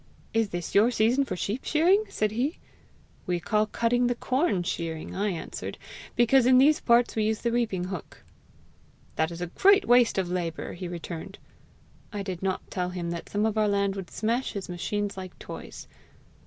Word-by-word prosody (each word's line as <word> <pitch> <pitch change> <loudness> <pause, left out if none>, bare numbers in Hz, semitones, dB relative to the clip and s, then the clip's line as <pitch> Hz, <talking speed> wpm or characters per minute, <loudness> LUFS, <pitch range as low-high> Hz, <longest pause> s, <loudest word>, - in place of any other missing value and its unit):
'Is 225 -2 +2
this 175 -2 -5
your 210 +4 +5
season 245 +4 +2
for 185 - -3
sheep 205 +7 -3
shearing?' 365 +7 +3
said 215 -1 0
he.'We 230 - -5
call 215 +4 +1
cutting 240 +3 +1
the 245 - 0
corn 255 - 0
shearing,' 165 -2 -4
I 205 +2 0
answered, 170 -4 -5 0.4
'because 240 +1 +4
in 255 0 +7
these 290 +4 +5
parts 235 0 +3
we 215 -1 +1
use 220 0 0
the 235 - 0
reaping 225 -7 0
hook.' 185 -2 -7 0.9
'That 160 0 +1
is 170 0 -8
a - - 0
great 395 0 +5
waste 245 -3 +4
of 190 -2 +1
labour!' 175 -2 -3
he 180 +1 -6
returned. 170 -1 -7 0.7
I 205 -2 -4
did 185 -3 -5
not 190 -1 -3
tell 180 -1 -1
him 175 -2 -4
that 170 -1 -6
some 210 +1 0
of 220 0 0
our 215 - +3
land 200 -1 +1
would 190 -2 -6
smash 230 +4 -1
his 200 -2 -5
machines 200 +3 -3
like 185 -1 -8
toys. - - -9
210 Hz, 180 wpm, -27 LUFS, 180-240 Hz, 0.9 s, in